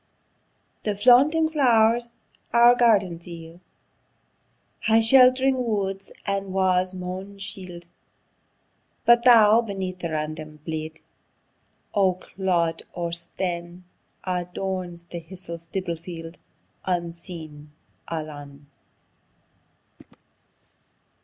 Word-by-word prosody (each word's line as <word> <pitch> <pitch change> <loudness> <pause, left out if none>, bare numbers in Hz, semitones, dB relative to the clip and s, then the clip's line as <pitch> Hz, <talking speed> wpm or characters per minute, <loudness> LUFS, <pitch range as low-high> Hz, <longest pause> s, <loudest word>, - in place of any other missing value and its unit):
The 210 -1 -1
flaunting 265 +9 +5
flow'rs 235 -5 +3 0.4
our 235 +1 +7
gardens 200 -9 +2
yield, 165 0 -10 1.3
High 220 0 +5
shelt'ring 255 +2 +5
woods 195 -4 -2
and 195 -1 -2
wa's 185 -1 +1
maun 185 +2 -6
shield; 185 -3 -8 1.2
But 235 0 +5
thou, 225 -2 +7
beneath 190 -4 -5
the 170 - -3
random 155 0 -5
bield 160 -1 -5 1.0
O' 190 -3 +3
clod 180 -3 -1
or 170 -1 -3
stane, 170 +1 -4 0.4
Adorns 180 -1 -4
the 170 0 -7
histie 170 0 -9
stibble 170 +1 -4
field, 165 0 -9 0.5
Unseen, 170 -4 -5 0.4
alane. 145 -3 -7
185 Hz, 85 wpm, -24 LUFS, 170-215 Hz, 1.3 s, our